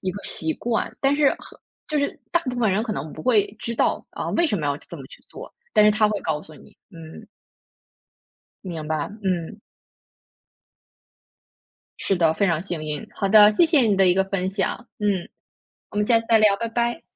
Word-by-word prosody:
一 185 - -1
个 200 +2 -7
习 160 -1 -2
惯， 235 -1 -2
但 275 +1 +3
是 290 -1 +3 0.5
就 305 - -2
是 285 -1 -1
大 345 - +3
部 250 -2 -4
分 220 -4 +2
人 210 +3 +1
可 225 -2 -3
能 150 -1 -5
不 155 - -9
会 215 -4 +2
知 235 - -4
道， - - 0
啊， - - -5
为 345 - +2
什 210 - 0
么 150 - -2
要 140 0 0
这 170 - -11
么 135 -2 -10
去 - - -16
做， - - -11 0.2
但 210 - +5
是 210 - +6
他 215 -1 +3
会 210 -1 -2
告 155 -1 -2
诉 155 - -12
你， - - -18
嗯。 165 -1 -12 1.4
明 165 -4 -6
白， 155 +1 -2
嗯。 185 +2 -2 2.4
是 195 - 0
的， 165 -2 +2
非 200 - +1
常 170 -1 0
幸 175 -5 -5
运。 150 -1 -5
好 195 - -1
的， 210 +1 +7
谢 275 - +4
谢 310 -5 +4
你 210 -4 +2
的 190 -1 +4
一 180 - +4
个 190 +1 +2
分 190 -1 -2
享。 200 +5 -3
嗯， 200 -4 -1 0.6
我 - - -10
们 210 0 +1
下 230 -2 +4
次 225 - -14
再 225 -1 +5
聊， 210 -2 +4
拜 230 +2 -3
拜。 235 +1 -1
200 Hz, 220 characters per minute, -23 LUFS, 170-230 Hz, 2.4 s, 的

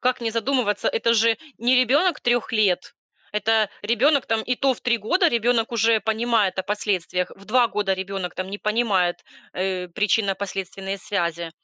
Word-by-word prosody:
Как 255 0 0
не 230 -1 -1
задумываться? 230 -2 0
Это 230 +1 +2
же 225 0 +3 0.2
не 245 +3 +2
ребёнок 290 +8 +3
3 240 -1 0
лет. 200 -5 +1 0.4
Это 215 0 +2
ребёнок 255 +6 +2
там, 225 -1 0
и 250 - +2
то 270 +1 +1
в - - -16
3 235 -1 +1
года 345 - +2
ребёнок 235 0 +2
уже 225 -1 +2
понимает 220 -2 0
о 190 - +1
последствиях. 185 -3 -2
В 195 0 -17
2 245 -1 +4
года 195 -1 0
ребёнок 190 -1 -5
там 185 +1 -5
не 200 - -5
понимает, 210 -6 +1 0.4
э, 185 -1 -2
причинно-последственные 195 0 -2
связи. 170 -4 -3
215 Hz, 165 wpm, -23 LUFS, 195-235 Hz, 0.4 s, 2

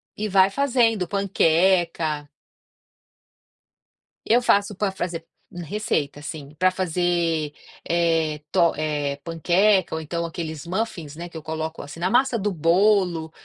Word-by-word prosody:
E 215 - -3
vai 190 0 +5
fazendo, 230 -5 +1
panqueca 170 -5 +1 2.0
Eu 240 +2 +4
faço 205 -3 +2
para 200 +1 -1
fazer 175 -3 -4 0.4
receita, 155 -6 -2
sim. 150 -1 -8
Para 185 +1 +4
fazer, 170 -4 0 0.3
eh, 165 -3 +1
tor 170 -3 +3
eh, 150 -2 -1
panqueca 180 +3 +2
ou 160 - -3
então 170 +2 -3
aqueles 160 -2 -6
muffins, 175 -6 -3
né, 170 +2 -7
que 170 - -9
eu 160 - -9
coloco 160 +1 -4
assim, 145 +3 -10
na 180 +2 0
massa 250 +1 +3
do 205 -1 -1
bolo 175 -1 +2
170 Hz, 130 wpm, -23 LUFS, 160-195 Hz, 2.0 s, vai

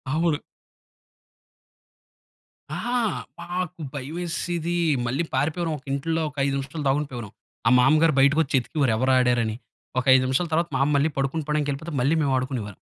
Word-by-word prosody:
అవును. 160 -2 +2 2.4
ఆ! - - -3 0.6
మాకు 180 -1 -4
భయమేసేది. 170 +3 -3 0.3
మళ్ళీ 135 +8 0
పారిపోయేవారం, 160 +5 0
ఒక 135 - -29
ఇంట్లో 160 +4 -1
ఒక 145 - -19
5 140 - 0
నిమిషాలు 145 +3 -5
దాగుండిపోయేవారం. 135 -6 -2 0.4
ఆ - - +7
మామగారు 155 +4 +4
బయటకు 140 +3 +5
వచ్చి, 140 - -2
ఎతికేవారు 135 0 0
ఎవరు 130 +3 +2
ఆడారని. 120 -3 +2 0.4
ఒక 125 - -3
5 130 0 +5
నిమిషాల 130 +7 +1
తర్వాత, 170 +2 +2
మామ్మ 140 +2 +2
మళ్ళీ 140 +3 +3
పడుకొని 135 +4 -1
పోవడానికి 150 -1 0
వెళ్ళిపోతే, 160 +4 -6
మళ్ళీ 140 +6 +3
మేము 140 -3 +1
ఆడుకునేవారం. 125 -6 -4
145 Hz, 145 wpm, -24 LUFS, 130-165 Hz, 2.4 s, ఆ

